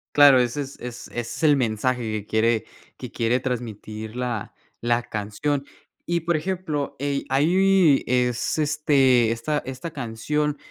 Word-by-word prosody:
Claro, 145 -2 +8
ese 125 +3 0
es 140 -1 -7
es 125 0 -8
ese 120 - -4
es 115 +7 -6
el 150 -2 +5
mensaje 125 0 0
que 105 -2 -3
quiere 110 +1 +1 0.3
que - - -8
quiere 120 +2 0
transmitir 110 -3 -5
la 120 -4 -3 0.3
la 120 0 +1
canción. 110 +8 -2 0.4
Y, 170 0 0
por 170 +1 0
ejemplo, 155 -4 -3
eh, 140 -1 -1
ahí 175 +2 +4
es, 125 +2 0
este 140 -6 +3
esta 145 +6 -1
esta 130 +5 -6
canción, 150 +3 -2
130 Hz, 145 wpm, -24 LUFS, 115-150 Hz, 0.4 s, Claro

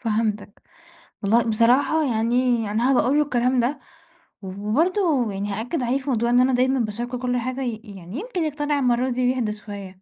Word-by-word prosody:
فهمتك، 215 -3 -2 0.6
والله 225 +4 +3
بصراحة 245 +8 +3
يعني 230 -1 +1
أنا 240 +5 +2
هابقى 255 - +3
اقول 265 +4 +1
له 300 - +4
الكلام 250 -2 +1
ده، 250 +5 0 0.6
و 190 - -8
وبرضه 265 - 0
يعني 200 +1 -3
هأكّد 245 +7 -3
عليه 255 +3 0
في 275 - -6
موضوع 235 -1 +1
إن 245 - +5
أنا 260 0 +2
دايمًا 260 +1 +2
باشاركهُ 240 +3 -3
كل 250 -1 -1
حاجة 255 +2 -3
ي 230 -4 -3
يعني 195 - -8
يمكن 395 -6 -3
يقتنع 295 -1 -1
المَرّة 250 0 +1
دي 250 0 0
ويهدى 225 -5 -1
شويّة، 200 -3 -9
245 Hz, 185 wpm, -23 LUFS, 220-265 Hz, 0.6 s, إن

